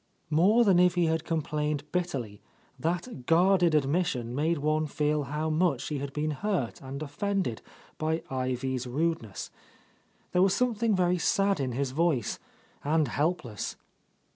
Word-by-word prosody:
'' - - -42
More 195 +10 +5
than 195 -5 +4
if 180 0 +4
he 175 -1 +3
had 160 -1 0
complained 150 -2 -1
bitterly, 135 - -3 0.4
that 165 - -3
guarded 175 0 +4
admission 140 -5 0
made 160 +5 +1
one 155 +1 0
feel 150 0 0
how 150 +3 -2
much 155 -5 +1
he 150 -2 -2
had 140 0 -4
been 150 +2 -1
hurt 175 - -2
and 140 +2 -6
offended 155 - -2 0.4
by 160 +1 -1
Ivy's 130 0 -2
rudeness. 135 -6 -2 0.8
There 180 - +3
was 195 0 +4
something 230 -2 +1
very 180 -1 +2
sad 195 +1 +2
in 130 -3 -1
his 135 +1 -1
voice, 150 -6 0 0.4
and 150 -1 +2
helpless. 145 - -2
155 Hz, 145 wpm, -28 LUFS, 135-180 Hz, 0.8 s, More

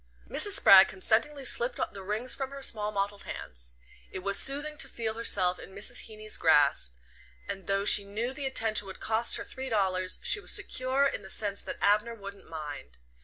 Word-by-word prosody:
Mrs. 410 - +4
Spragg 195 - +8
consentingly 250 +9 0
slipped 245 0 +1
the 200 - -9
rings 215 +6 -1
from 270 -1 -5
her 275 0 -10
small 210 -4 0
mottled 200 0 -4
hands. - - -9 0.3
It 185 - -8
was 200 0 +1
soothing 290 +2 +2
to 275 - -4
feel 225 -3 -4
herself 190 -5 +1
in 190 - -13
Mrs. 200 - -2
Heeny's 215 0 -9
grasp, 145 - +2 0.5
and 190 - -7
though 195 0 -1
she 205 - +7
knew 220 +6 -5
the 275 0 -5
attention 220 -5 0
would 190 - -10
cost 225 +2 0
her - - -6
three 265 0 -8
dollars 185 -4 -1
she 415 - +2
was - - -2
secure 260 +2 +1
in 275 - -2
the 190 - -13
sense 200 -1 -1
that - - -8
Abner 210 +3 +1
wouldn't 200 -2 -12
mind. 150 - -9
210 Hz, 190 wpm, -28 LUFS, 190-255 Hz, 0.5 s, Spragg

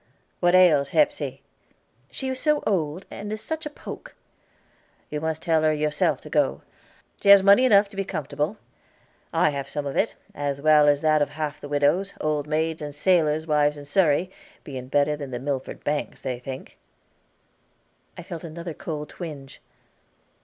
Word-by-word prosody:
"What 175 0 +3
ails 155 -7 +5
Hepsey?" 295 -1 +1 0.7
"She 265 - -5
is 260 0 -2
so 300 0 +2
old, 175 -3 -1
and 205 +1 -6
is 215 - -3
such 315 +6 -4
a - - -6
poke." - - -10 1.0
"You 150 0 -3
must 160 0 -3
tell 160 -2 +2
her 155 0 +3
yourself 150 0 0
to - - -11
go. - - +1 0.6
She 200 - +2
has 200 -1 +9
money 200 +6 +6
enough 205 -4 +5
to 200 - -14
be 195 - -1
comfortable; 150 +2 -3 0.7
I 150 - +3
have 140 -1 -5
some 145 -1 -4
of 140 - -4
it, - - +1 0.2
as 140 -1 -3
well 150 0 +5
as 145 0 +3
that 155 -1 +3
of 145 - +1
half 150 -1 -5
the 145 - -8
widows, 145 +7 +1
old 150 -1 -1
maids, 160 +1 -1
and 145 -1 -6
sailors' 155 -2 +2
wives 150 -1 +2
in 145 - -9
Surrey,' 170 +2 +2 0.3
being 130 -3 -7
better 145 +2 +2
than 145 -2 -7
the 125 - -4
Milford 135 +1 -4
banks, 145 0 -3
they 125 -2 -3
think." 130 +1 -9 1.4
I 175 - -7
felt 170 -2 -7
another 170 +1 -6
cold 150 -1 -5
twinge. 145 -6 -9
155 Hz, 175 wpm, -24 LUFS, 145-185 Hz, 1.4 s, has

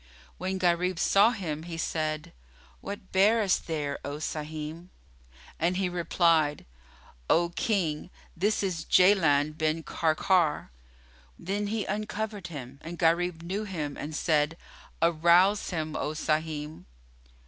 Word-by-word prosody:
When 190 +1 -2
Gharib 180 0 +1
saw 200 +5 +5
him 175 -10 -4
he 165 0 -7
said, 155 0 -2 0.5
"What 200 -1 -8
bearest 205 +1 +3
thou - - -6
there, 145 -2 -3
O 145 +1 -4
Sahim?"; 155 +2 -5 0.7
and 175 +3 +1
he 190 -1 0
replied, 165 -3 +2 0.6
"O 170 +1 +3
King, 175 -5 -1 0.3
this 205 +4 +1
is 175 -4 -2
Jaland 155 -7 +4
bin 155 +1 0
Karkar." 160 - +1 0.7
Then 205 +3 -2
he 215 0 -2
uncovered 210 -1 -3
him, 140 -5 -8
and 170 +2 -7
Gharib 170 0 +1
knew 195 +5 -3
him 155 -7 -4
and 150 +1 -6
said, 155 0 +1 0.5
"Arouse 170 +5 +4
him, 155 -3 -3
O 150 - -2
Sahim." 155 - -2
170 Hz, 125 wpm, -28 LUFS, 155-190 Hz, 0.7 s, saw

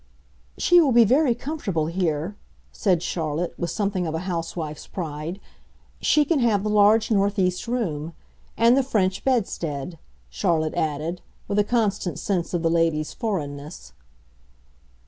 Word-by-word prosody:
"She 350 -1 +5
will 280 -6 +3
be 235 0 +7
very 260 +2 +3
comfortable 235 - -2
here," 170 +1 -1 0.4
said 180 -5 +1
Charlotte, 165 0 -2
with 170 - -2
something 195 -1 -1
of 160 - -3
a 160 - -2
housewife's 165 -3 -4
pride. 160 +1 -5 0.6
"She 300 -1 +4
can 310 0 +1
have 220 -5 +2
the 210 - -1
large 210 +2 +4
northeast 195 -2 +1
room. 170 -10 -2 0.4
And 230 +2 +5
the 275 - +4
French 195 -7 0
bedstead," 170 - -1 0.3
Charlotte 160 -5 0
added, 155 +3 -2 0.3
with 205 - 0
a - - +5
constant 205 -5 0
sense 180 -5 -2
of 170 - -1
the 165 - +2
lady's 165 -2 +1
foreignness. 150 - -5
185 Hz, 140 wpm, -24 LUFS, 160-220 Hz, 0.6 s, be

